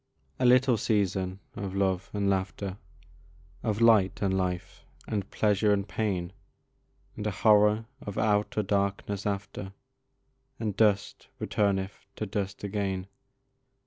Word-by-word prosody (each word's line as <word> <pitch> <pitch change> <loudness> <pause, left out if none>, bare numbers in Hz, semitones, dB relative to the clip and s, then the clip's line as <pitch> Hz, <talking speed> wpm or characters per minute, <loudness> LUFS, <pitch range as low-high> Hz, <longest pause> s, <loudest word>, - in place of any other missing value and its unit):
A 130 - +2
little 125 -1 +5
season 95 -3 0
of 100 -1 -4
love 95 -1 0
and 100 -1 -1
laughter, 95 0 -1 0.8
Of 110 0 -1
light 110 -5 +5
and 95 -1 +2
life, 90 -2 -3 0.2
and 100 -2 -2
pleasure 105 0 +2
and 100 -1 +1
pain, 95 -5 -2 0.8
And 105 0 -3
a - - +2
horror 105 +2 +4 0.2
of 100 - -6
outer 105 0 +1
darkness 100 0 -1
after, 100 -1 -4 0.9
And 105 -4 -2
dust 105 -2 +1
returneth 100 -1 -1
to 110 - -3
dust 100 -1 -4
again. 95 -2 -2
100 Hz, 120 wpm, -28 LUFS, 95-105 Hz, 0.9 s, little